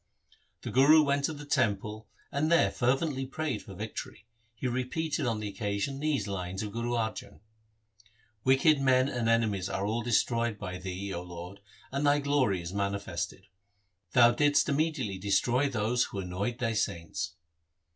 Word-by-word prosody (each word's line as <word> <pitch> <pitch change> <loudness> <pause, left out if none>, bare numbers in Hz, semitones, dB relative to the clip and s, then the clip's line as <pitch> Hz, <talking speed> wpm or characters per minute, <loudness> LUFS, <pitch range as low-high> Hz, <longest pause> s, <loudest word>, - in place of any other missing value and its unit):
The - - -4
Guru 150 +4 +7
went 140 -1 +1
to 160 - -1
the 145 0 -9
temple 110 -5 -1 0.2
and 155 +3 0
there 170 - +4
fervently 135 +2 0
prayed 140 -4 -3
for 95 - -11
victory. 105 0 -7 0.3
He 115 - -6
repeated 130 +4 -1
on 115 -2 0
the 105 - -4
occasion 100 +6 -3
these 145 -7 0
lines, 95 0 -4
of 105 - -5
Guru 115 +2 -2
Arjan: 110 -3 -3 0.5
— 110 +1 -33
Wicked 135 +3 +4
men 130 -1 +4
and 120 -4 -1
enemies 105 -5 +1
are 95 - -2
all 110 +3 -1
destroyed 115 0 +1
by 90 -3 -6
Thee, 95 +2 -5
0 85 -2 -3
Lord, 90 +2 -9 0.3
and 140 +2 -1
Thy 145 0 +5
glory 140 -10 +1
is 85 +2 -6
manifested. 100 -2 -3 0.7
Thou 120 -1 +7
didst 145 +4 +3
immediately 140 -9 0
destroy 120 +8 +2
those 120 0 +1
who - - -8
annoyed 95 +6 -3
Thy 115 -3 -1
saints. 85 -5 -2
115 Hz, 160 wpm, -29 LUFS, 100-135 Hz, 0.7 s, Guru